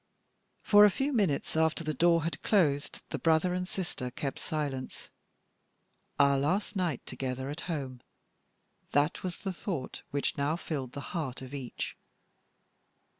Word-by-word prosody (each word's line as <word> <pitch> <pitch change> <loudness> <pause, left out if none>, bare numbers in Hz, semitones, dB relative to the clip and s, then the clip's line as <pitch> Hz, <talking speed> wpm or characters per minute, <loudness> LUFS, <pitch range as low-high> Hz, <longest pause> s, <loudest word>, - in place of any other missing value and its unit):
For 205 -1 +8
a 210 - +9
few 270 +8 -1
minutes 190 - +1
after 160 +1 +2
the 155 -1 -1
door 170 +2 +4
had 165 - -3
closed 150 -9 +2
the - - -2
brother 165 +2 +3
and 180 0 -1
sister 175 -10 -4
kept 135 +2 -4
silence. 140 -4 -4 1.1
"Our 140 -1 +5
last 185 +9 0
night 175 -9 -1
together 130 +1 -3
at 150 - -6
home!" 135 -6 -3 0.9
That 145 +2 +2
was 180 -2 -3
the 195 -2 -3
thought 170 -7 -4
which 140 0 -1
now 145 +3 +2
filled 140 -7 -4
the 140 - -5
heart 135 -7 -3
of 130 +1 -9
each. 135 -4 -4
155 Hz, 145 wpm, -31 LUFS, 140-180 Hz, 1.1 s, a